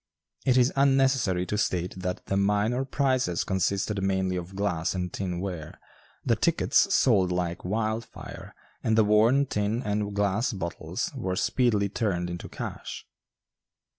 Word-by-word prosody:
It 130 -1 +5
is 125 +1 +4
unnecessary 135 -9 +3
to 105 +2 -2
state 90 -3 -1
that 90 -1 -4
the 95 - -1
minor 105 +6 +1
prizes 130 - +1
consisted 100 +2 0
mainly 95 -1 0
of 90 +1 -6
glass 95 -4 -1
and 90 -1 -3
tin 90 -3 -3
ware; 90 -5 -6 0.5
the - - +3
tickets - - +2
sold 95 -7 +4
like 90 -1 -2
wildfire, 110 +3 -4 0.3
and 110 0 +2
the 110 - +6
worn 110 +7 +4
tin 105 +1 -1
and 105 -1 -2
glass 105 +5 +1
bottles 85 -4 -4
were 95 0 -2
speedily 105 -1 +2
turned 90 -4 -1
into 85 - -6
cash. - - -6
100 Hz, 140 wpm, -27 LUFS, 90-115 Hz, 0.5 s, the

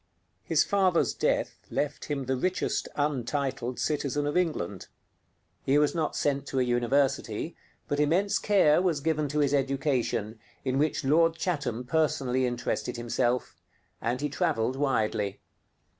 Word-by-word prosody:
His - - +3
father's 190 -4 +2
death - - 0
left 145 - -2
him 140 -3 -3
the 130 +1 0
richest 185 +8 -1
untitled 135 -3 -1
citizen 145 -1 -1
of 145 - -2
England. 150 - -1 0.8
He 135 +2 +3
was 150 0 +3
not 160 -2 -1
sent 140 -1 0
to 135 - -1
a - - +4
university, 125 +2 0 0.3
but 145 - -1
immense 175 +7 +2
care 180 -6 +4
was 175 -5 +1
given 155 0 0
to 145 +2 -3
his 145 -1 +2
education, 135 -5 0 0.3
in 130 +1 +1
which 150 -1 0
Lord 165 +4 +4
Chatham 140 -9 -2
personally 130 -3 +1
interested 120 0 -2
himself; 120 +1 -1 0.4
and 120 +3 -1
he 150 - -1
traveled 120 -3 0
widely. 110 -7 0
140 Hz, 140 wpm, -28 LUFS, 125-150 Hz, 0.8 s, a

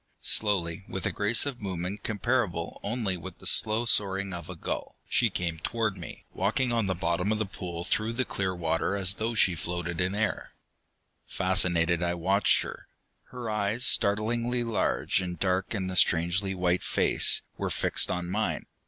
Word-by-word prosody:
Slowly, 95 -5 +1
with 95 - -4
a - - +1
grace 105 +5 +3
of 135 -4 -5
movement 95 0 -4
comparable 105 -6 -1
only 105 -4 -2
with 90 +1 -9
the - - -15
slow 110 +2 +2
soaring 100 -3 +1
of 85 -2 -7
a 90 - -6
gull, - - -5
she 120 - +3
came 85 -4 -3
toward 110 +2 -1
me, 85 -3 -10
walking 115 +7 0
on 115 -4 +1
the 95 - 0
bottom 90 +2 0
of 110 - +1
the 110 - -1
pool 90 -3 -6
through 110 +5 -1
the 130 +2 -1
clear 95 -3 -2
water 85 +3 0
as 95 -1 +2
though 115 +3 -3
she 95 -4 +3
floated 85 +1 -3
in 90 +2 0
air. 110 0 -2 0.7
Fascinated, 90 -3 +2
I 85 0 0
watched 95 +4 +2
her. - - -9 0.4
Her 125 -2 -7
eyes, 105 +3 -1
startlingly 115 +4 +2
large 115 -4 0
and 90 -1 -4
dark 95 +4 0
in 95 -3 -2
the 95 0 -4
strangely 90 +3 +2
white 90 0 +1
face, - - +4
were - - -3
fixed - - +2
on 90 0 -2
mine. 105 +5 -2
95 Hz, 175 wpm, -28 LUFS, 90-110 Hz, 0.7 s, face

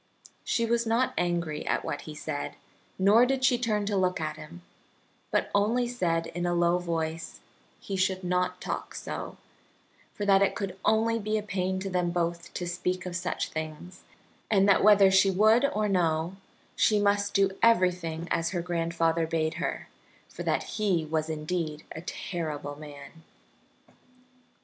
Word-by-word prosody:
She 230 -1 0
was 235 0 +1
not 235 +3 +1
angry 170 -3 -1
at - - 0
what 145 - -5
he 150 - -7
said, 145 -1 -4 0.4
nor 205 +5 +5
did 260 +1 +1
she 255 -2 +4
turn 215 -4 0
to 205 0 -1
look 185 -2 +1
at 155 -1 -3
him, 165 +3 -11 0.7
but - - 0
only 225 +5 +2
said, 170 -9 0
in 175 +1 -3
a 175 - +1
low 175 +1 +3
voice, 165 -2 -3 0.4
he 195 - -5
should 185 0 0
not 180 0 0
talk - - -5
so, - - -6 0.8
for 205 - -3
that 195 -1 +5
it 200 - +2
could 195 -4 -4
only 230 +1 +2
be 215 0 -1
a 210 - -3
pain 190 -2 -2
to 195 - -3
them 180 -1 +1
both 170 0 -2
to 175 - -3
speak 180 +1 -2
of 180 -1 -5
such 180 0 -2
things, 160 +3 -7 0.5
and 195 -2 +4
that 200 - +4
whether 200 -2 +7
she 190 +1 +5
would 215 +7 +4
or 215 -7 0
no, 170 -2 +1 0.4
she 210 -1 +3
must 205 0 +1
do 195 -1 +4
everything 180 -7 +2
as 165 0 +1
her 175 -2 -2
grandfather 165 -1 0
bade 160 -1 0
her, - - -3 0.4
for - - -9
that - - 0
he 190 -7 0
was 155 0 -1
indeed 155 0 -3
a 160 - -6
terrible 155 -5 -5
man. 145 +1 -11
180 Hz, 165 wpm, -28 LUFS, 165-205 Hz, 0.8 s, whether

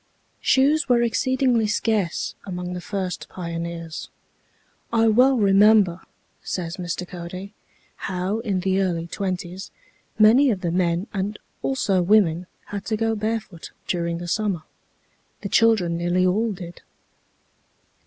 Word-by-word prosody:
Shoes 290 +4 +3
were 240 -1 +4
exceedingly 245 -1 +1
scarce 210 -4 0
among 180 -1 -5
the 180 - -5
first 190 -1 -4
pioneers. 170 -2 -5 0.8
"I 225 -1 +3
well 255 +4 +5
remember," 200 -3 +5 0.4
says 175 -1 -4
Mr. 180 0 -4
Cody, 180 +3 -8 0.4
"how, 190 +3 -2
in 200 -5 -1
the 190 +1 +1
early 170 -3 -1
twenties, 185 +1 -4 0.5
many 235 +6 +6
of 200 -6 -1
the 175 -3 -1
men 175 +1 +1
and 205 +1 -2 0.2
also 200 -9 +1
women 180 -3 +3 0.2
had 200 -1 -6
to 220 - -1
go 225 0 +1
barefoot 215 -5 -4 0.2
during 170 -1 -1
the 175 0 -6
summer. 195 -3 -1 0.8
The 200 - -4
children 200 -7 +3
nearly 175 +2 +1
all 215 +5 +1
did." 175 -3 -9
190 Hz, 125 wpm, -23 LUFS, 175-220 Hz, 0.8 s, many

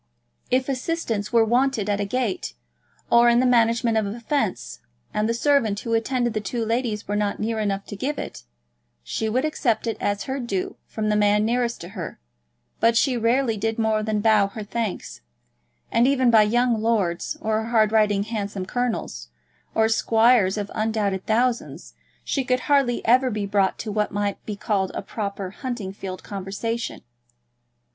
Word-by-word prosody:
If 255 +1 +1
assistance 255 -6 -2
were 230 -1 +5
wanted 240 -2 +1
at 205 -1 0
a 205 - 0
gate, 210 - -2 0.6
or 235 0 +6
in 235 0 +4
the 255 - +3
management 230 -1 +3
of 210 - -2
a 210 +4 -5
fence, 220 - -2 0.3
and 210 +1 0
the - - +2
servant 235 -6 +2
who 230 - -3
attended 240 +1 0
the 215 - -1
two 225 +3 -3
ladies 225 -2 -1
were 205 - -1
not 210 -1 -1
near 220 +1 -1
enough 200 -2 -1
to - - -7
give 275 +8 -3
it, - - -6 0.6
she 220 - -2
would 255 +6 +1
accept 250 -8 0
it 225 - -2
as 205 0 -1
her 270 +1 -3
due 200 -7 -3
from 215 -1 -2
the 210 - +2
man 210 0 +3
nearest 240 0 0
to 170 - -8
her; 185 -5 -7 0.6
but 230 0 +4
she 260 0 +3
rarely 235 0 +1
did 225 +2 -1
more 220 -1 +1
than 215 -1 -1
bow 215 -2 +4
her 210 +2 -7
thanks, 210 - -4 0.7
and, 235 +2 +4
even 260 -3 +3
by 220 -2 +7
young 235 +1 +2
lords, 205 -7 0
or 220 0 -1
hard 220 -2 +3
riding 210 -2 +3
handsome 205 -3 -4
colonels, 230 - -3 0.5
or 220 0 +4
squires 225 -2 +3
of 205 -1 -4
undoubted 215 -3 -1
thousands, 240 +2 -1 0.3
she 275 - -1
could 255 0 0
hardly 275 -4 +1
ever 255 +3 +4
be 210 -3 -2
brought 200 -1 +1
to 215 - -5
what 210 0 0
might 205 -1 -2
be 210 - -3
called 200 -2 -1
a - - -3
proper 200 -2 -4
hunting 235 -5 -5
field 185 -2 -7
conversation. 205 +4 -4
220 Hz, 175 wpm, -23 LUFS, 205-240 Hz, 0.7 s, by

